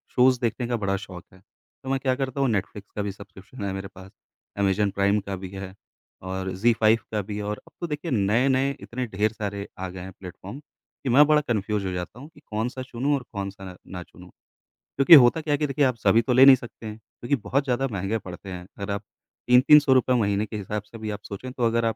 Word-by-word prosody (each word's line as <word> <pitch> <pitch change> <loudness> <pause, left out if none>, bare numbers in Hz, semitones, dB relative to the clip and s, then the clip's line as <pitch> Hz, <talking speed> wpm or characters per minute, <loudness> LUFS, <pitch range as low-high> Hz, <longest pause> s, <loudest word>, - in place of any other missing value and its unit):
Shows 125 0 +5
देखने 120 +1 -1
का 120 - 0
बड़ा 100 -2 -1
शौक 90 -2 -10
है, 95 - -17 0.4
तो 130 - -6
मैं 135 0 +1
क्या 130 -1 +1
करता 135 0 -3
हूँ, 135 - +2
नेटफ्लिक्स 100 -1 -3
का 105 - -2
भी 100 0 -2
सब्सक्रिप्शन 100 +3 -11
है 95 - -2
मेरे 95 0 -5
पास, 95 +1 -12 0.5
अमेज़न 100 +1 +2
प्राइम 100 +1 +2
का 100 - -2
भी 95 - -5
है, 95 -1 -7 0.5
और 95 0 -4
ज़ी 115 +5 +3
फ़ाइव 110 +1 +4
का 105 -1 0
भी 105 +1 -6
है। 105 - -4
और 105 +1 -4
अब - - -17
तो 175 - -2
देखिए, 150 +1 -4
नए-नए 130 +6 +2
इतने 125 +1 -4
ढेर 105 +1 0
सारे 100 -2 -5
आ 95 0 -4
गए 95 +1 -9
हैं 95 +1 -8
प्लेटफ़ॉर्म, 95 +6 -9 0.4
कि 135 - -1
मैं 140 +5 +7
बड़ा 150 -1 +4
कन्फ्यूज़ 105 -2 -1
हो 95 - -2
जाता 90 +6 -6
हूँ 140 - -10
कि - - -18
कौन-सा 115 +5 -3
चुनूँ 130 +3 -1
और 135 - -4
कौन-सा 95 -2 -6
ना 90 -1 -7
चुनूँ? 90 +1 -16 0.7
क्योंकि 135 +4 +6
होता 120 +6 +3
क्या 150 -1 -1
है - - +2
कि 150 - 0
देखिए, 140 +1 +2
आप 130 -2 +1
सभी 115 +1 +4
तो 120 +2 0
ले 130 +2 +8
नहीं 135 -1 +10
सकते 120 -2 -11
हैं, 110 0 -6 0.2
क्योंकि 120 +4 0
बहुत 135 +7 +1
ज़्यादा 135 0 0
महँगे 100 +2 -1
पड़ते 95 -1 -9
हैं, 90 -1 -7
अगर 100 +1 -4
आप 100 +1 -4 0.4
3-300 135 +3 +6
रुपए 130 0 +3
महीने 105 -3 +1
के 110 - -6
हिसाब 105 +1 -4
से 110 +2 -12
भी 110 -1 -5
आप 105 - -5
सोचें, 115 +6 -7
तो 125 -1 -4
अगर 115 0 +1
आप 115 - 0
110 Hz, 240 wpm, -25 LUFS, 100-130 Hz, 0.7 s, नहीं